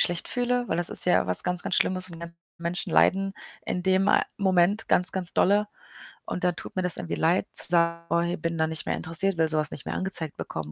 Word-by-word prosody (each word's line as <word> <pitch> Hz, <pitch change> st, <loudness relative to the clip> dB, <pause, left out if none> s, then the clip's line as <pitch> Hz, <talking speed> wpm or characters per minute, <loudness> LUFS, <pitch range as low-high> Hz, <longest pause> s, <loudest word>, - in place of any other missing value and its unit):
schlecht 175 Hz, -1 st, 0 dB
fühle, 245 Hz, -1 st, 0 dB
weil 165 Hz, -, 0 dB
das 175 Hz, 0 st, +1 dB
ist -, -, +1 dB
ja 180 Hz, -, +3 dB
was 90 Hz, -, +3 dB
ganz, 180 Hz, 0 st, -2 dB
ganz -, -, -2 dB
Schlimmes 185 Hz, 0 st, +2 dB
und 170 Hz, -, -10 dB
die -, -, -12 dB
ganzen 170 Hz, 0 st, -9 dB, 0.2 s
Menschen 170 Hz, +1 st, -4 dB
leiden 195 Hz, +1 st, +3 dB, 0.3 s
in 180 Hz, -, -3 dB
dem, 190 Hz, +1 st, +2 dB
äh, -, -, +4 dB, 0.2 s
Moment 190 Hz, +2 st, +2 dB
ganz, 180 Hz, -2 st, +2 dB
ganz 185 Hz, -2 st, -2 dB
dolle 205 Hz, +2 st, +3 dB, 0.6 s
und 180 Hz, -, -5 dB
dann 180 Hz, -2 st, +1 dB
tut -, -, -9 dB
mir 185 Hz, -, 0 dB
das 180 Hz, -2 st, +1 dB
irgendwie 175 Hz, -2 st, -4 dB
leid, 175 Hz, +5 st, +1 dB
zu -, -, +1 dB
sagen: 170 Hz, -1 st, +1 dB
„Oh 170 Hz, -, +2 dB
hey, 175 Hz, +1 st, -2 dB
bin 165 Hz, +1 st, -3 dB
da 160 Hz, 0 st, +1 dB
nicht 160 Hz, 0 st, -4 dB
mehr -, -, -1 dB
interessiert, 170 Hz, +3 st, -1 dB
will 160 Hz, -1 st, +2 dB
so 155 Hz, -, -1 dB
was 150 Hz, -1 st, +1 dB
nicht 140 Hz, -, -9 dB
mehr -, -, -4 dB
angezeigt 170 Hz, -5 st, -1 dB
bekommen“, 75 Hz, -1 st, -6 dB
175 Hz, 250 wpm, -26 LUFS, 165-190 Hz, 0.6 s, äh